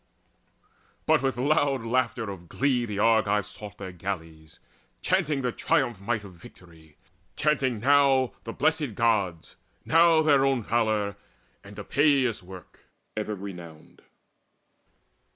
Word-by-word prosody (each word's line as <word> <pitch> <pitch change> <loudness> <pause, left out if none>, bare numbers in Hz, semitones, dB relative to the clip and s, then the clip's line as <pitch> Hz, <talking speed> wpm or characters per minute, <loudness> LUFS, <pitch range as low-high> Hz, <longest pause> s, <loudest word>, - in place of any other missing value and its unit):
But 155 -3 +3
with 135 -3 -1
loud 135 -1 +1
laughter 120 -2 -1
of 85 -3 -11
glee 130 -3 0
the 105 -2 -5
Argives 105 -2 +2
sought 105 -2 -9
Their 95 -2 -7
galleys, 80 -4 -7 0.4
chanting 155 -7 0
the 125 - 0
triumphant 120 - -1
might 110 -3 0
Of 100 -2 -11
victory, 85 -3 -17 0.4
chanting 135 -6 0
now 135 0 +3
the 115 - -6
Blessed 150 - 0
Gods, 100 -8 0 0.3
Now 165 -1 +5
their 145 -3 +4
own 135 -4 +1
valour, 110 -3 0 0.5
and 100 +1 -13
Epeius' 135 +1 +1
work 90 -1 -14 0.3
Ever 105 -1 -3
renowned. 90 -5 -11
115 Hz, 120 wpm, -26 LUFS, 100-135 Hz, 0.5 s, Now